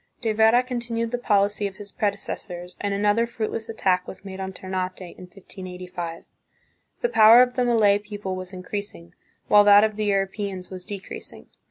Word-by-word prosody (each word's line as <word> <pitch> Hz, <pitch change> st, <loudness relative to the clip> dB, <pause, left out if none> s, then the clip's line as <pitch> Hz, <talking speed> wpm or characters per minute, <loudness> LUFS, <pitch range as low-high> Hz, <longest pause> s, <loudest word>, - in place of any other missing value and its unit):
De 225 Hz, -3 st, 0 dB
Vera 225 Hz, +3 st, +4 dB
continued 235 Hz, -2 st, -3 dB
the 245 Hz, -, -2 dB
policy 205 Hz, -2 st, +1 dB
of 195 Hz, -, -10 dB
his 205 Hz, 0 st, -10 dB
predecessors 190 Hz, -4 st, -4 dB
and 205 Hz, -, -1 dB
another 205 Hz, +3 st, +2 dB
fruitless 225 Hz, -1 st, -4 dB
attack 185 Hz, -5 st, 0 dB
was 190 Hz, +1 st, -10 dB
made 190 Hz, -1 st, -8 dB
on 190 Hz, 0 st, -4 dB
Ternate 185 Hz, 0 st, -4 dB
in 180 Hz, 0 st, -10 dB
1585. 180 Hz, -3 st, -8 dB, 0.8 s
The 485 Hz, -, +1 dB
power 225 Hz, -, +8 dB
of 250 Hz, 0 st, -2 dB
the 250 Hz, -, +1 dB
Malay 215 Hz, -4 st, +4 dB
people 205 Hz, -2 st, -6 dB
was 185 Hz, 0 st, -7 dB
increasing, 185 Hz, -2 st, -7 dB, 0.3 s
while 210 Hz, 0 st, +7 dB
that 205 Hz, 0 st, +7 dB
of 215 Hz, -1 st, 0 dB
the 215 Hz, -, -1 dB
Europeans 195 Hz, -1 st, -2 dB
was 185 Hz, -1 st, -8 dB
decreasing. 200 Hz, -2 st, -8 dB
205 Hz, 170 wpm, -24 LUFS, 185-220 Hz, 0.8 s, power